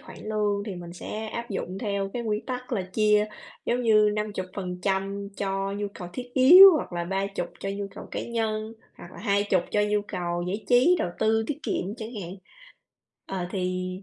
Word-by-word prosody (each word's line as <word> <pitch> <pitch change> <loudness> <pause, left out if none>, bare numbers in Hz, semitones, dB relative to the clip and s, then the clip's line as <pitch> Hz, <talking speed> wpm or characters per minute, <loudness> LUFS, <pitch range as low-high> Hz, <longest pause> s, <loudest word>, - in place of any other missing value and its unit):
khoản - - -12
lương 210 -2 -1
thì 200 - -4
mình 175 -1 -8
sẽ 215 +5 -6
áp 235 +2 -5
dụng 190 -1 -4
theo 200 -2 -2
cái 240 - -3
nguyên 215 -1 -2
tắc 250 0 -5
là 200 - 0
chia 210 +3 +2 0.4
giống 245 +1 +1
như 215 -2 +5
50% 195 -1 -3
cho 195 0 -2
nhu 205 0 -2
cầu 180 -3 -7
thiết 245 +3 -7
yếu 355 +10 +10
hoặc 295 - -4
là 175 0 -2
30 195 0 -2
cho 195 - -3
nhu 200 0 -3
cầu - - -9
cá - - -3
nhân, 220 -1 -2 0.2
hoặc 175 - -12
là - - -12
20 200 -3 +1
cho 210 - +2
nhu 210 0 +2
cầu 175 -1 -2
giải 200 +4 -3
trí, 255 +9 +5
đầu 175 - -1
tư, 220 0 +2
tiết 295 - -3
kiệm 195 +3 -2
chẳng 225 +1 -7
hạn. 175 +2 -7 0.9
Ờ, 185 -2 -4
thì 185 -1 -2
205 Hz, 195 wpm, -26 LUFS, 190-220 Hz, 0.9 s, yếu